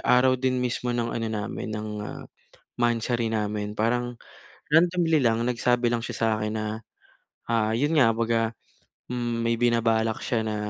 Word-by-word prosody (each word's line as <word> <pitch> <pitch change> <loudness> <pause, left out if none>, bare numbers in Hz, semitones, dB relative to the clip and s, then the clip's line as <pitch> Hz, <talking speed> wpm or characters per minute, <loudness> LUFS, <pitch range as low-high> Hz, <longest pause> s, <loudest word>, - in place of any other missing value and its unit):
araw 125 +1 +5
din 130 -1 +1
mismo 125 0 -1
ng 115 -1 -1
ano 115 -1 -2
namin 110 0 -4
ng, 105 0 -4 0.2
ah, - - -7 0.6
monthsary 120 0 +1
namin 105 -1 -2
parang 120 +3 0 0.6
randomly 170 0 +4
lang 115 -2 +2
nagsabi 120 0 +2
lang 115 -1 -1
siya - - -5
sa 115 - +3
akin 105 0 -2
na, 110 -1 -2 0.8
ah, 110 -2 +2
iyon 145 +7 +1
nga 115 -4 +6
kumbaga 115 0 +1 0.7
hmm, 120 -1 -2
may 115 - +2
binabalak 115 -2 +2
siya 120 -4 0
na 110 -1 -2
115 Hz, 155 wpm, -26 LUFS, 110-125 Hz, 0.8 s, nga